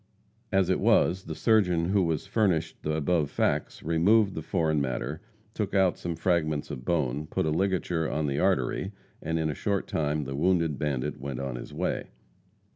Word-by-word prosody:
As 95 -2 +3
it - - +1
was, 95 +2 +3
the - - -5
surgeon, 90 -7 +2
who 95 -4 +2
has 80 +2 -1
furnished 100 -5 0
the 75 0 -1
above 80 -1 +1
facts, - - -1
removed 95 +6 +3
the 80 - -4
foreign 80 -3 0
matter, 70 +3 -3 0.3
took 105 -3 -2
out 95 -2 +4
some 85 -1 -4
fragments 80 -3 0
of 60 - -6
bone, 75 -2 -1
put - - -1
a 80 - +1
ligature 85 -2 0
on 75 0 -1
the 70 0 -1
artery, 95 +2 0 0.3
and 80 +1 -1
in 80 -1 0
a - - -3
short 100 +7 -1
time 75 -1 -1
the 70 0 -5
wounded 85 -2 +1
bandit 70 -5 -2
went 70 -1 -5
on 70 -2 -3
his - - -8
way. - - -2
80 Hz, 185 wpm, -28 LUFS, 75-95 Hz, 0.3 s, out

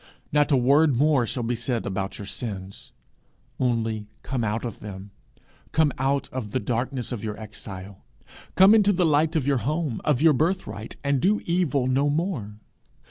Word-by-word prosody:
Not 150 +1 +3
a 140 - +5
word 140 +3 +4
more 140 -3 +3
shall 120 +2 -3
be 115 +1 -1
said 115 0 -2
about 95 0 -3
your 100 - -7
sins 100 -3 -7 0.7
only 115 -4 0 0.2
come 125 -3 -2
out 110 +2 -1
of 120 - -6
them; 100 -1 -9 0.6
come 155 -2 +3
out 135 +1 +1
of 115 -6 -6
the 130 - +1
darkness 125 +1 -2
of 115 -5 -4
your 105 -1 -4
exile; 100 -3 -9 0.5
come 190 +3 +7
into 205 -2 +5
the 180 -1 +2
light 155 +1 +2
of 150 -5 +1
your 140 -2 +2
home, 150 -2 -2
of 145 -5 +2
your 160 +1 +5
birthright, 140 - -2
and 140 -2 +1
do 210 +6 +3
evil 170 -7 +1
no 135 +3 +2
more. 145 - -2
130 Hz, 175 wpm, -25 LUFS, 110-150 Hz, 0.7 s, come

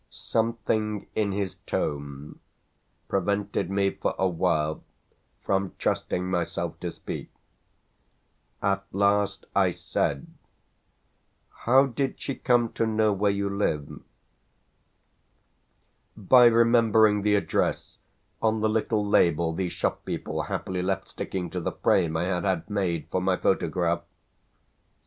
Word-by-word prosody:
Something 110 -2 -1
in 105 -2 0
his 95 -1 -3
tone 70 0 -4 0.7
prevented 100 0 -1
me 100 0 +1
for - - -3
a 95 - +2
while 80 -4 0 0.6
from 95 -1 0
trusting 90 0 -1
myself 90 -2 -2
to - - -3
speak. - - -7 1.3
At 100 0 +1
last 100 +1 +1
I - - +4
said: 70 -1 -2 1.4
"How 130 +3 +6
did 135 +1 -2
she 135 - -3
come 120 -3 +1
to 115 - 0
know 110 -1 +2
where 100 +1 +1
you 100 0 0
live?" 75 -7 -2 2.2
"By 120 +4 +6
remembering 115 -3 +5
the 105 0 +3
address 100 - -1 0.4
on 110 -1 +1
the 110 - +2
little 110 -1 0
label 85 -4 +3
the 90 +2 -2
shop - - -2
people - - -3
happily 90 -1 -3
left 95 +1 -2
sticking 90 -3 -4
to 90 - -3
the - - -3
frame 80 -4 +2
I 85 - 0
had 90 -1 -1
had 95 -4 -1
made 90 -6 -1
for 95 - 0
my 95 0 +1
photograph." 85 -1 0
100 Hz, 120 wpm, -26 LUFS, 90-110 Hz, 2.2 s, How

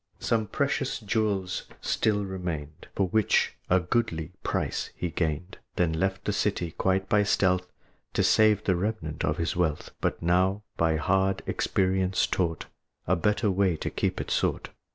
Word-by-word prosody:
Some 110 -2 0
precious - - -1
jewels 100 -3 -1
still 105 -2 +1
remained, 85 -5 -5
For 95 - +2
which 110 0 +2 0.2
a 90 - +5
goodly 90 -3 -1
price - - -2
he 90 - -3
gained, 80 +3 -2 0.2
Then 85 -2 +1
left 95 +4 -1
the 105 - 0
city, 95 -5 0
quite 95 +3 0
by 105 +1 +4
stealth, 90 -2 +1 0.4
To - - +2
save 110 -2 +4
the 95 - +2
remnant 90 -5 -3
of 75 - 0
his 85 -2 -1
wealth; 80 -4 -1
But - - 0
now, 95 +4 +2
by 80 -1 +2
hard 95 +4 +1
experience 95 0 +1
taught, 85 -4 -1 0.4
A - - +3
better 105 +4 +1
way 95 -3 +2
to - - -4
keep - - -1
it - - -4
sought. - - 0
95 Hz, 155 wpm, -27 LUFS, 85-100 Hz, 0.4 s, a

